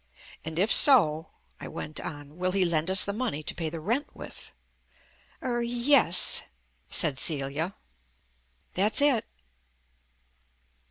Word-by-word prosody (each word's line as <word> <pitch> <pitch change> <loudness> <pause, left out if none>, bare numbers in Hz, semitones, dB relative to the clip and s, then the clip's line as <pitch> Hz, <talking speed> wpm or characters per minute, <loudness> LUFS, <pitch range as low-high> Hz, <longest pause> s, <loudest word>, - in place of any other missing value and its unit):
"And, 160 0 -7
if 200 +6 +3
so," 160 - +5 0.3
I - - -8
went 155 - -5
on, 145 0 -9
"will 185 0 -2
he 195 -2 +1
lend 165 0 -1
us 190 0 +5
the 200 - -4
money 215 - -4
to - - -2
pay 165 -2 -5
the 165 +1 -8
rent 235 - -4
with?" - - -10 0.9
"Er 240 -2 -2
yes," 240 -5 +3 0.5
said 145 -4 +1
Celia. 150 +4 -1 1.0
"That's 205 +7 0
it." 285 -6 +2
185 Hz, 125 wpm, -26 LUFS, 155-235 Hz, 1.0 s, so